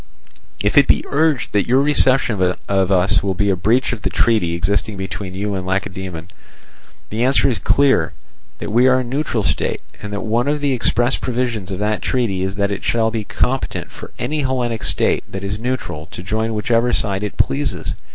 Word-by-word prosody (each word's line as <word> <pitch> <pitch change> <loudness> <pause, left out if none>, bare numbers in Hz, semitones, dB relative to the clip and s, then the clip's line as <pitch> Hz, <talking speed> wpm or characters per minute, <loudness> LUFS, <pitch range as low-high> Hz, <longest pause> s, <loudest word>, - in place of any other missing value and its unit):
"If 105 +6 +4
it 140 - +4
be - - +3
urged 145 -3 +1
that 100 -2 +2
your 130 +2 +4
reception 135 -7 +3 0.3
of 95 -1 +1
us 95 0 +3
will 95 -1 -1
be 100 +2 +1
a - - +2
breach 115 +8 +1
of 115 - -6
the - - -1
treaty 105 -8 +1
existing 100 +4 -1
between 95 -1 -5
you 100 +1 -2
and 95 -1 -3
Lacedaemon, 95 -2 -4 0.8
the 115 +2 0
answer 130 +2 +3
is 115 -6 0
that 80 - 0
we 120 +4 +4
are 130 0 +4
a - - -1
neutral 125 -2 -1
state, - - -1 0.2
and 105 - -6
that 100 -1 -3
one 115 +4 0
of 150 +1 +1
the 145 -2 +1
express 120 +1 +1
provisions 120 -6 -2
of 95 - -4
that 105 +1 -1
treaty 115 -8 0
is 95 +1 -2
that 100 0 0
it 100 - -4
shall 115 -1 +1
be 110 -1 -2
competent 130 +5 -2
for - - -10
any 155 0 -2
Hellenic 125 -4 -1
state - - +1
that 95 0 -5
is 100 +2 -3
neutral 110 -11 -4
to 90 - -9
join 110 +3 -1
whichever 115 +3 +1
side 100 -2 0
it 105 -1 -4
pleases. 70 0 0
105 Hz, 195 wpm, -19 LUFS, 95-125 Hz, 0.8 s, If